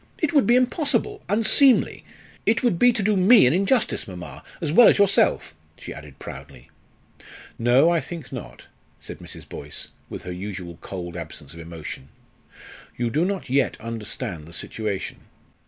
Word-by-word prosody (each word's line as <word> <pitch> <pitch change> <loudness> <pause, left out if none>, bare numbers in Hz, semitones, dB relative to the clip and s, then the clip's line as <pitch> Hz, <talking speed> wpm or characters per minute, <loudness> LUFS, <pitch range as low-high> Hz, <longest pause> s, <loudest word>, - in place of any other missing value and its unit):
It 315 -1 -1
would 285 -4 +4
be 240 - +5
impossible 255 0 +1
unseemly. 230 +5 +4 0.4
It 230 - +2
would 210 -9 +2
be 245 - +6
to 220 - -2
do 210 +1 +2
me 200 - +7
an 125 - +4
injustice, 200 +7 +1
mamma, 90 -7 -9 0.2
as 155 - -2
well 235 +8 +8
as - - +5
yourself," 200 -1 +3 0.2
she - - -8
added 75 -2 -12
proudly. - - -11 0.9
"No, 125 +8 +4
I 170 - +3
think 160 -1 -8
not," - - -9 0.3
said - - -10
Mrs. - - -11
Boyce, - - -7 0.2
with - - -7
her 90 - -5
usual 90 -3 -7
cold 90 -3 -7
absence 80 -4 -8
of 85 - -11
emotion. 80 -5 -8 0.9
"You 120 -1 -1
do 155 +7 +1
not 195 -1 -3
yet 135 +1 +1
understand 105 -8 -5
the 85 - -12
situation. 100 +4 -4
130 Hz, 160 wpm, -23 LUFS, -, 0.9 s, well